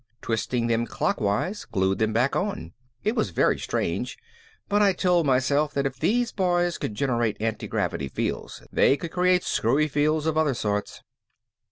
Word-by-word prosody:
Twisting 115 +1 -1
them 115 0 +1
clockwise 110 - -1
glued 95 -1 0
them 110 0 +1
back 120 +5 +1
on. 185 - -3 0.3
It 215 +3 0
was - - 0
very - - +2
strange, - - -2 0.5
but 205 0 +2
I 200 -2 +4
told 175 -3 +2
myself 140 +3 +2
that 140 -1 0
if 135 -1 -3
these 240 +1 +1
boys 175 -2 +1
could 105 - -4
generate 120 -4 0
antigravity 110 -9 -2
fields - - -4
they 140 - +4
could 165 +1 -6
create 180 0 +2
screwy 140 +7 +1
fields 150 +1 +1
of 160 -1 +1
other 150 -5 +2
sorts. 105 -2 -3
140 Hz, 160 wpm, -25 LUFS, 115-175 Hz, 0.5 s, I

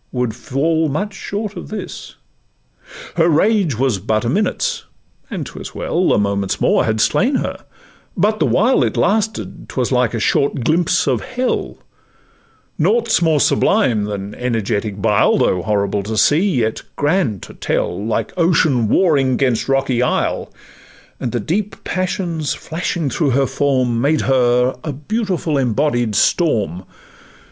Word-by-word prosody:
would 125 -2 -1
much 110 - -7
fall 155 - -1
short 205 +2 -5
of - - -8
this. 210 -3 -7 1.0
Her 165 0 +4
rage 170 - +2
was 125 -5 +1
but 110 +3 -1
a - - +1
minute's, 450 - -1 0.4
and - - -4
'twas - - -9
well— 180 +2 0
A - - +3
moment's 100 -1 -1
more - - +2
had 110 0 0
slain 255 - +2
her; - - -3 0.5
but 210 +4 +1
the - - +2
while 240 +7 +3
It - - -1
lasted 220 +1 -1
'twas 125 -1 -2
like 125 -2 +1
a - - -1
short 135 +3 +1
glimpse 170 +5 +2
of - - +1
hell: 255 0 -2 1.0
Nought 225 +8 +2
's - - +3
more 160 -3 +3
sublime 125 - +2
than 100 0 -5
energetic 110 -4 -2
bile, 105 0 +3
Though 90 - +1
horrible 100 0 0
to 110 +2 -4
see 160 - +3
yet 115 - -1
grand 145 - 0
to - - -10
tell, 95 +3 -2
Like 110 0 -2
ocean 155 -9 +2
warring 135 - +2
'gainst 125 -4 0
a - - 0
rocky 135 -3 +1
isle; 125 - -1 0.7
And 120 - -3
the 120 - -1
deep 195 - -2
passions 180 -5 -2
flashing 160 -3 -3
through 140 -2 +1
her 140 - +3
form 130 -5 0
Made 150 +3 +2
her 125 -1 +2
a 150 - -3
beautiful 170 - -2
embodied 120 -3 0
storm. 100 - +1
135 Hz, 150 wpm, -18 LUFS, 115-180 Hz, 1.0 s, Her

